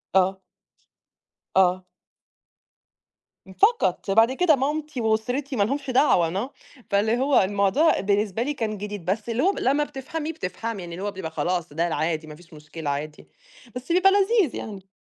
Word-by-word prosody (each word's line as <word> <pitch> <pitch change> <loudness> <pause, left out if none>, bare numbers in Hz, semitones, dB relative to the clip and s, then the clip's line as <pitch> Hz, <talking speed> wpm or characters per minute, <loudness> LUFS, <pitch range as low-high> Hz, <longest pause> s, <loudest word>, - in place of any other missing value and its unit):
آه. 190 0 +3 1.2
آه. 185 0 +3 1.7
فقط، 430 - +2
بعد 225 +5 +5
كده 315 +2 +3
مامتي 290 0 -2
وأسرتي 245 +6 -1
ما 205 - +3
لهمش 275 +5 -2
دعوة، 195 - +2
no، - - -19 0.4
فاللي 220 +3 +2
هو 270 +2 +3
الموضوع 200 - +2
بالنسبة 205 +2 0
لي 295 +3 -2
كان 220 -5 -3
جديد، 205 -3 -6
بس 210 +5 -2
اللي 230 +3 0
هو 390 +3 +3
لمّا 280 +3 +2
بتفهمي، 295 +3 -5
بتفهمي، 205 - -5
لإن 170 +1 -7
هو 205 +1 -3
بيبقى 185 -5 -6
خلاص 175 -2 -2
ده 170 +2 0
العادي، 160 -1 -2
ما 150 - -9
فيش 170 +1 -18
مشكلة 150 0 -7
عادي، 150 +2 -5 0.5
بس 255 +6 -6
بيبقى 370 +3 +5
لذيذ 400 - +2
يعني. 195 -3 -7
215 Hz, 150 wpm, -24 LUFS, 185-280 Hz, 1.7 s, بعد